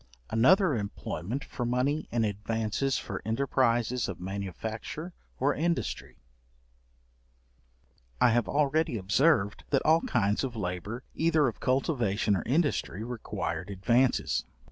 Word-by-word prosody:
Another 170 - +5
employment 105 +3 -4
for 125 - -5
money 125 +5 0
in 115 -1 +1
advances 110 +5 -1
for 100 -3 -5
enterprises 120 0 +1
of 90 - -6
manufacture 100 - -5 0.3
or 140 +3 +2
industry. 170 +3 -2 2.0
I - - +5
have 120 +1 +2
already 150 -2 +1
observed, 100 - +2
that 135 - +1
all 160 +2 +5
kinds 105 -1 +1
of 130 -3 -3
labour, 100 +4 -4
either 160 -3 +3
of 115 - -4
cultivation 120 -6 +1
or 90 - -1
industry, 135 - 0
required 115 -5 -4
advances. 120 +7 +2
120 Hz, 115 wpm, -29 LUFS, 105-140 Hz, 2.0 s, Another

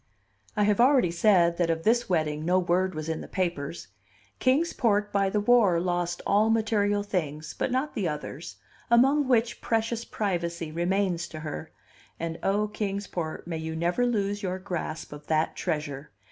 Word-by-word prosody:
I 210 - +3
have 210 +2 +3
already 255 -9 +5
said 170 -1 +3
that 175 -2 +1
of 165 0 -1
this 235 +1 +2
wedding 155 -3 0
no 180 +3 +2
word 185 0 +1
was 155 0 -4
in 160 -1 -2
the - - -8
papers. 170 - -3 0.5
Kings 285 +7 +2
Port 210 -3 +1
by 195 -1 +2
the 210 - 0
war 205 -5 +4
lost 175 0 -1
all 210 +2 +3
material 205 -2 +1
things, 155 -6 -3
but - - -1
not 260 +4 -1
the 200 -6 -1
others, 150 +1 -6 0.3
among 270 +4 +4
which 235 -2 +1
precious 230 0 0
privacy 170 -7 -3
remains 175 +1 0
to 155 -2 -8
her; 155 0 -6 0.5
and, 165 0 -4
O 205 +2 +1
Kings 205 -1 -3
Port, 160 -5 -5
may 165 -2 -4
you 160 0 -4
never 175 +9 +1
lose 205 -3 -1
your 185 -2 -2
grasp 175 -5 -5
of 145 0 -11
that 155 0 +1
treasure! 150 -4 -3
185 Hz, 175 wpm, -27 LUFS, 165-210 Hz, 0.5 s, already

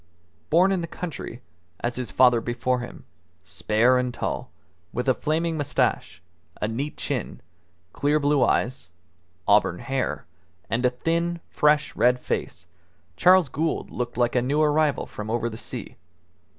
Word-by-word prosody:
Born 180 +5 +5
in 190 -2 0
the 170 - -4
country, 160 -8 -7 0.4
as 120 0 -2
his 125 -4 -3
father 125 -2 +5
before 120 +2 -1
him, 120 - -9 0.4
spare 110 +9 +2
and 125 0 -1
tall, 120 - -4 0.4
with 125 +2 -3
a 130 - +5
flaming 160 +4 -1
moustache, 85 - -1 0.4
a - - 0
neat 135 +7 -4
chin, - - -3 0.5
clear 145 +2 +2
blue 145 -2 +3
eyes, 120 -6 0 0.6
auburn 100 -3 +4
hair, 130 - -2 0.5
and 115 +3 0
a - - +3
thin, 170 +7 -1
fresh, 150 0 +2
red 125 +1 +3
face, - - -4 0.5
Charles 180 - +5
Gould 155 +5 -2
looked 120 -1 -4
like 120 0 +1
a 125 - +4
new 140 +5 0
arrival 150 -1 +2
from 105 0 -7
over 120 +1 -1
the - - -7
sea. - - -7
130 Hz, 150 wpm, -25 LUFS, 120-150 Hz, 0.6 s, Born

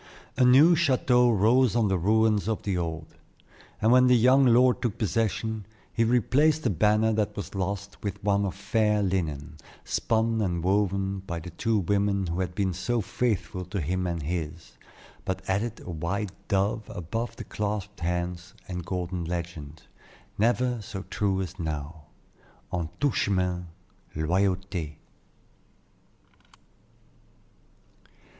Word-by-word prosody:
A 130 - +3
new 140 +8 +7
chateau 125 -6 +3
rose 115 +3 +3
on 115 -3 +3
the 95 -1 +1
ruins 110 +2 +2
of 110 -2 -2
the 100 -2 -1
old, 80 -2 -3 0.7
and 110 +1 +3
when 125 0 +6
the 125 -1 +6
young 130 +3 +5
lord 125 +1 +4
took 120 -3 -2
possession, 110 -1 -1 0.3
he 115 - +2
replaced 135 +7 +3
the 120 - +2
banner 105 +5 +3
that 105 -1 -1
was 100 - -5
lost 100 +1 -4
with 100 0 -5
one 100 0 +2
of 95 -2 -2
fair 105 +1 +1
linen, 80 -5 -2 0.3
spun 115 0 0
and 85 -4 -1
woven 100 0 +1
by 85 - -3
the 85 +2 -9
two 110 +6 0
women 100 +1 +1
who 85 +1 -3
had 90 -1 -2
been 95 -3 0
so 95 +7 -1
faithful 105 -2 -2
to 95 +3 -4
him 90 +4 -1
and 85 -3 -3
his, 80 0 -4 0.5
but 95 0 -4
added 105 +4 -1
a 90 - -7
white 90 +5 -3 0.2
dove 100 +2 0
above 115 +8 -4
the - - -7
clasped 105 -1 -4
hands 90 +1 -3
and 90 -1 -5
golden 90 -1 -3
legend, 80 -3 -6 0.5
never 120 +2 +1
so 100 -3 -7
true 100 -2 0
as 95 +1 -8
now, 75 -1 -5 0.7
"En 85 -3 -2
tout 145 -2 +2
chemin 90 -3 0 0.5
loyauté." 90 -1 -1
100 Hz, 140 wpm, -27 LUFS, 90-110 Hz, 0.7 s, new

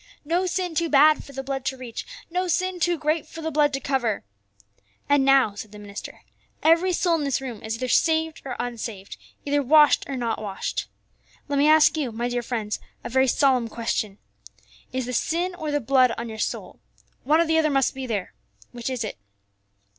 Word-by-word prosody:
No 350 +4 +1
sin 360 -1 -2
too 335 +1 0
bad 300 +1 +5
for - - -12
the 270 0 -5
blood 270 -1 -3
to 265 0 -2
reach, 245 -3 -7 0.2
no 365 +1 0
sin 365 +1 0
too 345 0 +1
great 310 +1 -1
for 325 +1 -9
the 320 - -2
blood 295 -1 +3
to 270 - -1
cover. 255 -6 -1 0.8
And 285 -1 +4
now," 270 -6 +4
said 205 +1 -8
the 210 - -11
minister, 205 -1 -9 0.4
"every 330 +4 +4
soul 350 0 +1
in 305 - -2
this 275 -2 0
room 250 -5 -7
is 220 0 -3
either 255 +2 -3
saved 320 +4 +2
or 265 - -5
unsaved, 225 -5 -5 0.3
either 290 0 +2
washed 295 +2 +5
or 270 - -3
not 230 -3 -2
washed. 200 -3 -3 0.6
"Let 285 -1 0
me 290 - +4
ask 310 +1 +6
you, 275 -6 -1
my 235 +2 -2
dear 245 0 -1
friends, 225 -3 -3 0.2
a - - -5
very 265 +2 +3
solemn 255 -2 +3
question: 220 -3 -2 0.7
Is 260 -1 -2
the 250 - -5
sin 345 +8 0
or 315 -4 -5
the 290 0 +1
blood 255 -1 +3
on 235 0 -5
your 220 0 -7
soul? - - -4 0.4
One 300 +5 +3
or 335 - +4
the 320 0 +2
other 310 -1 +2
must 270 -2 +2
be 265 -1 -6
there. 205 -5 -3 0.4
Which 240 0 -5
is 255 -3 -2
it?" 215 - -6
270 Hz, 205 wpm, -24 LUFS, 235-315 Hz, 0.8 s, ask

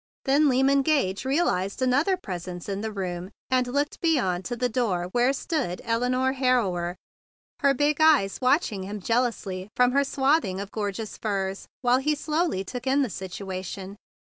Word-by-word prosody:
Then 285 +2 +4
Lyman 270 +2 +3
Gage 265 -9 +1
realized 260 - 0
another 280 +9 +2
presence 180 - -6
in 200 0 -3
the 220 0 -3
room, 180 -3 -4 0.2
and 255 -1 +2
looked 285 +4 -1
beyond 215 - +1
to 240 - -3
the 250 +1 0
door 210 -8 -1
where 245 +4 +3
stood 275 - -2
Elinore 250 +3 +1
Harrower, 210 -10 +1 0.6
her 280 -1 +3
big 290 +2 +2
eyes 295 -11 +4
watching 255 - +2
him 205 +2 -5
jealously 210 -4 -1
from 250 0 +4
her 280 +2 +3
swathing 270 - +1
of 200 0 -6
gorgeous 210 0 -4
furs, 195 -2 -2 0.2
while 245 +1 +4
he 300 +3 +1
slowly 305 - -1
took 250 +6 -6
in 275 +2 +3
the 245 - -3
situation. 190 +1 -6
245 Hz, 160 wpm, -26 LUFS, 190-275 Hz, 0.6 s, Then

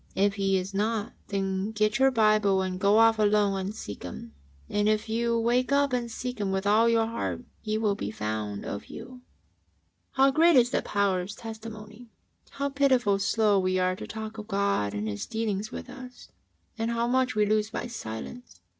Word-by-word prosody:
If 200 +1 +2
He 195 -2 +1
is 190 +1 -4
not, 215 +1 -1
then 195 +1 -2
get 215 +2 +1
your 270 0 +6
Bible 215 -5 +3
and 185 -1 -3
go 200 +2 +4
off 225 -1 +5
alone 205 -2 +3
and 195 +3 -4
seek 100 - -8
Him, 80 -4 -8 0.3
and 205 +1 +1
if 215 +1 0
you 235 +1 0
wake 240 +3 +1
up 280 -1 +2
and 240 -1 -1
seek 250 +1 -5
Him 200 -2 -1
with 190 +1 -1
all 220 +3 +4
your 230 -1 +3
heart, 230 +2 -4 0.2
He 215 0 -2
will 215 -2 +1
be 105 - -4
found 105 -1 -4
of 100 - -6
you. 255 -1 -10 0.5
" - - -44
How 270 +1 +4
great 330 +3 +5
is 245 -1 +5
the - - +1
power 200 -3 0
of 195 +3 -7
Testimony 220 0 -9
I - - -28
How 280 0 -1
pitifully 260 -8 +2
slow 205 0 +2
we 185 0 0
are 185 0 +1
to - - -8
talk 220 +1 -7
of 210 - -8
God 200 - 0
and 105 +1 -3
His 100 -1 -4
dealings 215 -1 -2
with - - -7
us, 255 -1 -11 0.5
and 225 +1 0
how 235 0 0
much 255 0 +1
we 210 -1 +3
lose 215 0 +1
by 225 - -4
silence 225 - -8
215 Hz, 200 wpm, -27 LUFS, 195-235 Hz, 0.5 s, your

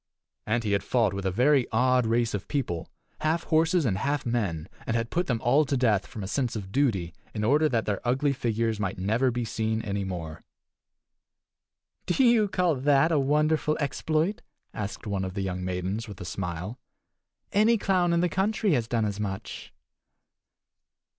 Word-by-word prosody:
And 115 +2 +1
he 105 - -1
had 100 -1 +2
fought 115 -6 +1
with 95 0 -3
a - - +1
very 130 +5 +3
odd 125 +1 +3
race 115 0 +1
of 100 -2 -4
people, 85 - -2 0.3
half 160 +2 0
horses 160 +1 +2
and 95 -6 0
half 145 +4 -1
men, 100 -10 -1 0.2
and 115 - 0
had 115 0 -1
put 175 +1 0
them 120 -3 0
all 135 +6 +4
to 135 0 0
death, 110 -6 +2
from 105 - -7
a - - -4
sense 125 +2 -1
of 95 -3 -6
duty, 100 - 0 0.2
in 105 - -2
order 150 +7 +3
that 115 -4 0
their 100 -2 -2
ugly 135 +4 +1
figures 115 -4 -1
might 95 -2 -2
never 110 +8 +1
be 120 -1 -2
seen 110 0 -1
any 100 -1 -2
more. 85 -5 -6 1.6
"Do 220 +9 +2
you 235 -3 +5
call 180 -3 +1
that 140 +4 +3
a 155 - +3
wonderful 150 +2 +2
exploit?" 155 +6 0 0.3
asked 105 0 -5
one 100 -2 -2
of 95 0 -5
the 100 - -2
young 90 -1 -3
maidens, 95 +5 -3
with 100 -3 -9
a - - -6
smile. 90 +6 -5 0.7
"Any 220 +3 +4
clown 185 -4 +2
in 170 0 +2
the 180 - +3
country 200 +2 +1
has 120 -5 0
done 115 -2 0
as 100 -1 -3
much." 95 -2 -5
120 Hz, 185 wpm, -27 LUFS, 100-150 Hz, 1.6 s, you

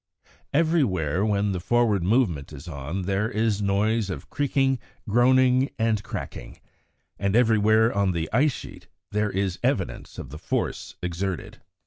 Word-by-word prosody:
Everywhere 105 - +1
when 105 -1 +1
the 95 - -2
forward 115 0 +2
movement 90 - +1
is 75 +3 -10
on 80 +4 -4
there 100 +4 0
is 110 -2 0
noise 105 +2 +1
of 80 -7 -6
creaking, 135 -2 +1 0.3
groaning, 130 +4 +4
and 110 -2 +1
cracking, - - -7 0.6
and 100 0 0
everywhere 110 -1 +4
on 100 -2 +2
the 85 -2 -2
ice 140 +6 +4
sheet - - -10 0.2
there 105 0 +1
is 95 -2 -2
evidence - - -2
of 65 - -8
the 75 - -8
force - - -3
exerted. 90 +1 -4
105 Hz, 140 wpm, -25 LUFS, 95-120 Hz, 0.6 s, groaning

